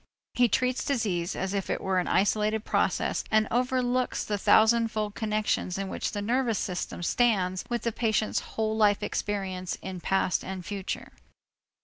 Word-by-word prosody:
He 245 -1 +4
treats 255 +3 +1
disease 200 -10 -1
as 190 +1 -2
if 195 -2 -2
it - - 0
were 190 -1 0
an 180 - -2
isolated 215 +2 +1
process - - 0
and 215 0 +3
overlooks 250 +1 0
the 205 -1 -2
thousandfold 220 -1 +3
connections 215 -4 -1
in 195 -1 -3
which - - -3
the 205 -1 -3
nervous 235 0 +1
system 180 -1 -3
stands 190 -4 +1
with 240 -1 -2
the 235 - 0
patient's 220 -1 0 0.2
whole 220 0 0
life 210 -2 +3
experience 190 -3 -3
in 190 -1 -5
past 195 -1 +1
and 190 -2 -6
future. 200 -1 -4
210 Hz, 155 wpm, -28 LUFS, 190-230 Hz, 0.2 s, He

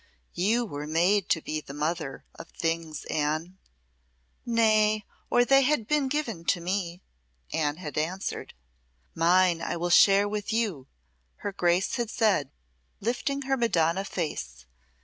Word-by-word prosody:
"You 225 +7 +1
were 145 -6 -6
made 175 +5 +2
to 160 - +1
be 155 0 -3
the 140 - -10
mother 155 -1 -3
of - - -11
things, 165 -1 -3
Anne." 155 +5 -2 0.9
"Nay, 215 -2 +3 0.2
or 245 0 +4
they 270 +2 +5
had 265 -5 +1
been 295 -1 +2
given 260 - -2
to 180 - +2
me," 180 0 -3 0.5
Anne 150 -1 0
had 150 -5 -4
answered. 180 +5 -4 0.6
"Mine 175 0 +3
I 170 - -2
will 175 +1 -2
share 200 +3 +6
with 210 +1 -3
you," 205 - -1 0.6
her 205 - 0
Grace 180 -1 +1
had 240 -2 -2
said, 210 - +1 0.5
lifting 250 +6 -2
her 270 0 +1
Madonna 190 -7 +1
face. 70 - -5
185 Hz, 140 wpm, -27 LUFS, 160-220 Hz, 0.9 s, share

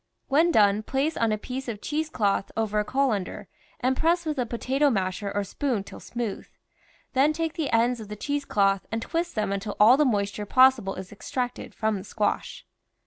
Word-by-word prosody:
When 315 +5 +4
done, 205 -5 +4
place 275 +7 -1
on 230 -1 +1
a 215 - +1
piece 260 +5 -6
of 220 -4 -4
cheese 305 +6 -2
cloth 200 -7 0
over 215 -1 0
a - - +1
colander 210 -6 -1 0.3
and 255 +1 +2
press 335 +4 +1
w^ith 305 -3 -2
a 245 - 0
po 235 - -4
tato 275 +4 +2
masher 195 -2 -1
or 205 0 -1
spoon 235 +1 -2
till - - -11
smooth; 235 -4 -5 0.7
then 280 +4 +4
take 325 0 -2
the 315 -5 -2
ends 235 +1 +2
of 215 - -8
the 210 - -6
cheese 285 +7 -2
cloth 195 -6 +1
and 225 +1 -2
twist 340 +1 -2
them 215 -2 0
until 200 +1 -3
all 225 +5 +7
the 300 - +4
mois 200 -5 +1
ture 205 +1 -6
possible 255 -5 +4
is 185 0 -8
extracted 245 +4 -4
from 220 -1 0
the 190 - -7
squash. 210 +1 -2
230 Hz, 205 wpm, -26 LUFS, 205-275 Hz, 0.7 s, all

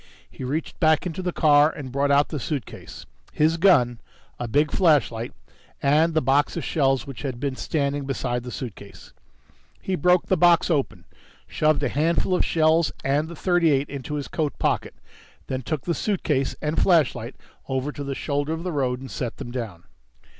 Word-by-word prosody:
He - - -10
reached 145 +6 -3
back 155 -1 +3
into 180 +1 -4
the 180 -1 -2
car 150 -2 +5
and 135 -5 -8
brought 140 +2 0
out 140 +1 +3
the 150 - -4
suitcase, 135 -2 -6 0.3
his 160 +2 +2
gun, 130 -11 +4 0.4
a 120 - -3
big 145 +6 +2
flashlight 145 - +2 0.5
and 155 +4 +2
the 160 - +2
box 140 +5 +2
of 165 - -3
shells 135 -4 +1
which 135 -3 -8
had 130 -4 -4
been 140 -1 -2
standing 140 -1 -2
beside 125 -2 -2
the 125 - -8
suitcase. 105 -6 -9 0.7
He 190 - -4
broke 180 +1 +3
the 190 - +2
box 175 0 +4
open, 145 -4 -1 0.4
shoved 155 -1 +1
a - - +1
handful 165 +5 +1
of 180 - +2
shells 160 0 +2
and 145 +3 +1
the 170 - -8
.38 160 -5 +2
into 140 +1 -5
his 145 -2 -4
coat 150 -5 -2
pocket, - - -1 0.5
then 130 -1 -3
took 150 +2 -4
suitcase 165 -6 -1
and 150 +1 0
flashlight 165 -8 +2 0.3
over 135 +2 -1
to 145 - -7
the 140 -1 -4
shoulder 145 +2 -2
of 165 +1 -5
the 180 - -3
road 130 -4 -1
and 135 - -9
set 120 -2 -4
them 120 - -7
down. 110 -9 -6
145 Hz, 180 wpm, -24 LUFS, 135-160 Hz, 0.7 s, car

